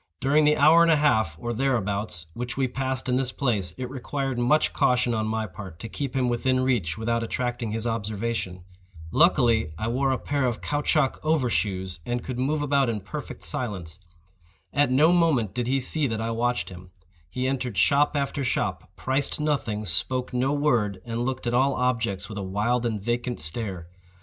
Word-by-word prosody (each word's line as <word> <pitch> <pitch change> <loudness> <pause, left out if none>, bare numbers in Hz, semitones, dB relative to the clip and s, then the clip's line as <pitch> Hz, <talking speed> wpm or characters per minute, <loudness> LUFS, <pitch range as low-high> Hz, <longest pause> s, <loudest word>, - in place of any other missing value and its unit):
During 145 +4 +3
the 150 0 +4
hour 155 +4 +7
and 170 - +5
a - - +6
half, 110 - +2
or 120 0 -3
thereabouts, 105 -8 -1
which 120 +4 -5
we 135 -1 +2
passed 130 +1 -3
in 125 0 +2
this 130 -1 0
place, 105 - -1
it 130 - -4
required 135 0 -3
much 130 +6 +3
caution 125 -1 +2
on 110 -1 -1
my 110 0 -1
part 95 -3 -9
to 115 - -7
keep 135 +3 -4
him 130 -2 +2
within 130 +2 +1
reach 115 -11 0
without 115 +1 0
attracting 120 0 -2
his 110 +1 -3
observation. 110 -4 -3 0.5
Luckily 120 - +3
I 110 - -2
wore 135 +3 +1
a 130 - +1
pair 140 0 -1
of 120 -3 -2
caoutchouc 145 -1 0
over 155 -6 +1
shoes, 95 -4 -1
and 120 +4 -3
could 125 -2 -5
move 145 +3 0
about 140 -3 +2
in 110 -3 -2
perfect 95 - -7
silence. 90 -3 -4 0.7
At 145 -2 +3
no 150 +6 +5
moment 155 - +2
did 120 0 -2
he 135 +2 +2
see 145 +3 +1
that 110 -2 -2
I 115 +1 -2
watched 120 +2 0
him. 90 0 -11 0.4
He 125 +7 -2
entered 125 -5 -2
shop 140 - +3
after 140 0 -1
shop, 125 - -2
priced 135 +3 -1
nothing, 135 -8 -1
spoke 125 +10 -1
no 130 +2 +1
word, 120 -10 +1
and 120 0 -2
looked 130 0 -3
at 120 - 0
all 130 +2 +3
objects 115 -6 -1
with 105 -2 -6
a - - -3
wild 105 +6 0
and 110 -2 -2
vacant 120 +3 -2
stare. 85 +1 -3
120 Hz, 190 wpm, -25 LUFS, 110-135 Hz, 0.7 s, hour